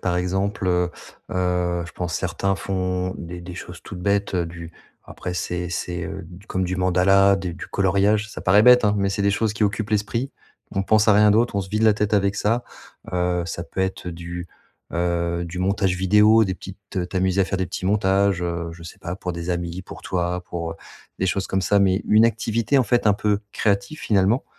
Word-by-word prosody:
par 90 -1 0
exemple, 95 +2 -1
heu 90 0 +1 0.4
heu. 90 -1 0
Je - - -10
pense 85 -2 -4
certains 95 +2 -1
font 90 -1 -2
des 85 +1 -7
des 90 0 -8
choses - - -9
toutes 90 - -8
bêtes, 100 +1 0
heu, 85 -2 0
du 85 0 -9 0.3
après, 90 - -6
c'est 90 0 -3
c'est, 85 0 -3
heu, 95 +2 -5
d 90 +4 -13
comme 95 -3 -2
du 90 +1 -2
mandala, 95 +2 +4
d 95 -2 -4
du 85 - -8
coloriage, 100 +3 +2
ça - - -7
paraît 100 +3 +5
bête, 125 0 +7
hein, 105 0 +3
mais 100 -1 +1
c'est 100 +1 -1
des 100 - +3
choses 110 +1 0
qui 105 - +1
occupent 105 +1 -2
l'esprit. 110 +5 -1 0.4
On 95 - 0
pense 110 +2 +3
à 105 - +7
rien 105 0 +6
d'autre, 115 +1 +2
on - - +2
se 95 - -10
vide 110 +2 -1
la 110 -2 +5
tête 105 0 -1
avec 100 0 +2
ça. 115 +5 +1 0.5
Heu, 90 -1 0
ça 85 0 -5
peut 95 - -5
être 95 -1 -2
du, 85 +1 -6 0.5
heu, 85 0 -1
du 85 +1 -6
montage 95 0 +1
vidéo, 105 +4 +5
des 95 -2 -2
petites 95 -1 -6
t'amuser 95 0 +1
à - - +4
faire 95 0 -2
des 95 - -1
petits 95 +1 -4
montages, 100 -2 +2
heu, 85 -1 -2
je 85 - -12
sais 85 - -10
pas, 90 +2 -5
pour 90 -2 -4
des 85 +1 -4
amis, 85 +1 -3
pour - - -11
toi, 90 0 -2
pour, 85 -2 -4
heu - - -11 0.4
des 95 - 0
choses 95 +1 -1
comme 95 0 0
ça, 100 - +3
mais 95 +1 +2
une 110 +2 +6
activité, 115 +4 +1
en - - +5
fait, 120 -2 +1
un 105 - +5
peu 105 0 0
créative, 120 +9 0
finalement, 105 +4 +2
95 Hz, 220 wpm, -23 LUFS, 90-105 Hz, 0.5 s, bête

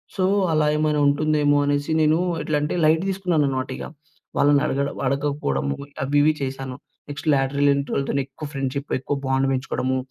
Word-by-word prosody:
So, 185 - 0 0.3
అలా 155 -1 +2
ఏమైనా 150 -1 +1
ఉంటుందేమో 145 0 +2
అనేసి 145 +2 0
నేను 155 +1 +4 0.2
ఎట్లం‌టే, 150 0 -1
లైట్ 160 +1 +4
తీసుకున్నాను 180 -6 +1
అనమాట 130 -1 -2
ఇగ. - - -7 0.5
వాళ్ళని 145 0 +4
అడగ 135 - -1 0.3
అడగకపోవడం 140 - -1 0.4
అవి 140 +2 0
ఇవి 155 +1 +4
చేశాను. 135 -1 -4 0.3
నెక్స్ట్ 145 +2 -7
లేట్రల్ 140 +1 +2
ఎంట్రీ 140 0 -3
వాళ్ళతోని 140 0 0
ఎక్కువ 140 +3 -9
ఫ్రెండ్షిప్, 140 +1 -3
ఎక్కువ 140 +2 -2
బాండ్ 135 0 +1
పెంచుకోడము. 130 0 -1
145 Hz, 155 wpm, -23 LUFS, 135-150 Hz, 0.5 s, నేను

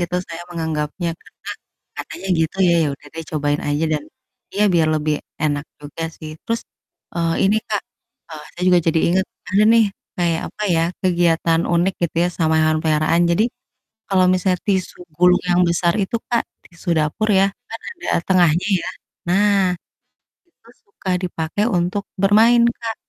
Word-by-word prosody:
gitu 175 +1 -1
saya 165 0 -7
menganggapnya 160 0 -3
karena, - - -11 0.5
katanya 195 - -7
gitu 160 +3 -1
ya, 170 - +4
ya - - +1
udah 145 - -19
deh 165 - -6
cobain 145 -1 0
aja 145 +2 0
dan, 150 -1 -1 0.5
iya 205 - 0
biar 160 -2 +3
lebih 155 0 0 0.3
enak 145 -1 0 0.2
juga 145 +3 -7
sih. 155 -1 -8
Terus, 230 0 -1 0.5
eee, 170 -1 0
ini 205 +3 +3
Kak, 210 -2 -1 0.5
eee, 155 -1 -8
saya 180 - -6
juga 180 -1 +6
jadi 165 0 +2
inget, 190 +1 +2 0.3
ada 205 +2 +5
nih, 230 -1 +6 0.3
kayak 170 -2 +1
apa - - -9
ya, 165 - +2 0.2
kegiatan 170 -2 +2
unik 175 +3 +2
gitu 170 -1 -1
ya - - +2
sama 160 -2 +2
hewan 155 0 +2
peliharaan, 155 +1 +2
jadi, 190 +6 +3 0.6
kalau 185 -2 +3
misalnya 185 -1 +1
tisu 190 -3 -1 0.2
gulung 180 0 +5
yang 175 +1 +4
besar 170 0 +2
itu 215 +5 -1
Kak, 235 -1 +2 0.3
tisu 170 +1 -12
dapur 155 +8 0
ya, 195 - +5 0.2
kan 225 - -7
ada 350 - -9 0.2
tengahnya 175 -2 +3 0.2
ya 180 - -4 0.4
nah, 195 0 +3 0.7
itu 325 -9 -25 0.2
suka 200 -1 -8
dipakai 175 +3 -2
untuk 180 +4 -1 0.2
bermain 220 +4 +5 0.2
Kak, 225 -1 -4
175 Hz, 165 wpm, -20 LUFS, 160-195 Hz, 0.7 s, juga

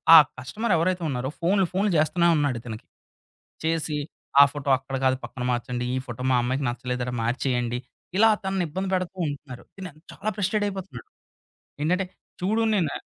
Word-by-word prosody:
ఆ - - +13 0.2
కస్టమర్ 200 - -1
ఎవరైతే 180 +2 +1
ఉన్నారో 130 -1 -2
ఫోనులు, 190 +2 +2
ఫోనులు 200 +2 +2
జేస్తూనే 170 +3 +3
ఉన్నాడు 145 -4 +1
ఇతనకి. 110 -2 -8 0.8
"చేసి, 160 -2 0 0.4
ఆ - - +12
ఫోటో 145 -1 -4
అక్కడ 135 +1 -6
గాదు 130 0 +3
పక్కన 125 - -6
మార్చండి. 125 0 -2
ఈ - - 0
ఫోటో 120 +1 -6
మా 125 - +4
అమ్మాయికి 130 +3 -1
నచ్చలేదట, 125 0 -3
మార్చేయండి." 120 0 0 0.4
ఇలా 225 +2 +7
తనని 190 -1 0
ఇబ్బంది 190 +5 -3
బెడుతూ 185 0 -1
ఉంటున్నారు. 140 -3 -8
తిను 185 -3 -7 0.2
చాలా 215 - -3
ఫ్రస్ట్రేట్ 205 +1 +1
అయిపోతున్నాడు. 190 -11 -7 0.7
ఏంటంటే 180 +5 +2 0.4
చూడు 215 +5 +1
నేను 180 -6 +2
అ - - -3
150 Hz, 160 wpm, -25 LUFS, 125-190 Hz, 0.8 s, ఆ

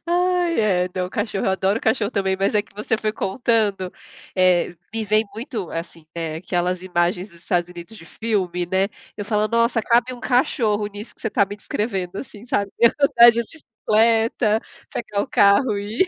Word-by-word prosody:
Ai 355 -3 +1
é, 185 -4 +2
não, 180 -1 -2
cachorro, 195 0 -2
adoro 190 +3 +1
cachorro 220 -1 +1
também, 190 -3 0
mas 195 +2 +1
é 205 - +3
que 205 - -25
você 210 +1 -1
foi 215 0 -2
contando, 205 -4 0 0.4
eh, 180 -2 +3 0.2
me 225 -1 -2
vem 215 +2 +2
muito 225 - -5
assim, 165 -1 -7
ne, 165 -2 -3
aquelas 180 +1 -2
imagens 180 +1 -1
dos 170 - -17
Estados 175 0 -1
Unidos 175 +5 -10
de 165 - -13
filme, 180 -5 -2
né, 190 +2 +1 0.3
eu 205 - -4
falo: 215 0 0
"Nossa, 230 0 +2
cabe 240 +3 +2
um 245 - -9
cachorro 220 -4 +1
nisso 205 +2 -10
que - - -27
você 220 - -1
tá 200 - +3
me 205 +1 -7
descrevendo", 195 -3 -3
assim, 230 -4 -9
sabe, 200 -5 -1 0.3
andar 240 -4 +7
de 235 +1 -1
bicicleta, 225 -4 +1 0.3
pegar 205 -3 -3
o - - -5
carro 205 +2 +4
e 215 - 0
210 Hz, 180 wpm, -22 LUFS, 185-230 Hz, 0.4 s, andar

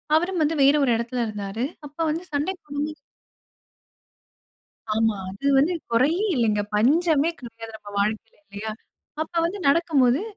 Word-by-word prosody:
அவரும் 350 +2 +1
வந்து 310 +1 +2
வேற 280 +2 +6
ஒரு 250 - +3
இடத்துல 235 +1 -2
இருந்தாரு. 210 +2 -4 0.2
அப்ப 290 +2 -12
வந்து 330 +4 -2
சண்டை 295 +7 0
போடும்போது 295 +1 -4 2.0
ஆமா. 220 -2 +2
அது 200 +9 -4
வந்து 310 +7 +3 0.2
குறையே 305 - +3
இல்லங்க. 215 -4 +2
பஞ்சமே 310 +6 +3
கிடையாது 225 -2 -10
நம்ம 205 -1 -12
வாழ்க்கையில 215 +2 -1
இல்லையா? 205 +2 -6 0.5
அப்ப 320 - -5
வந்து 390 +4 -3
நடக்கும்போது, 280 -2 +3
270 Hz, 135 wpm, -24 LUFS, 225-315 Hz, 2.0 s, வேற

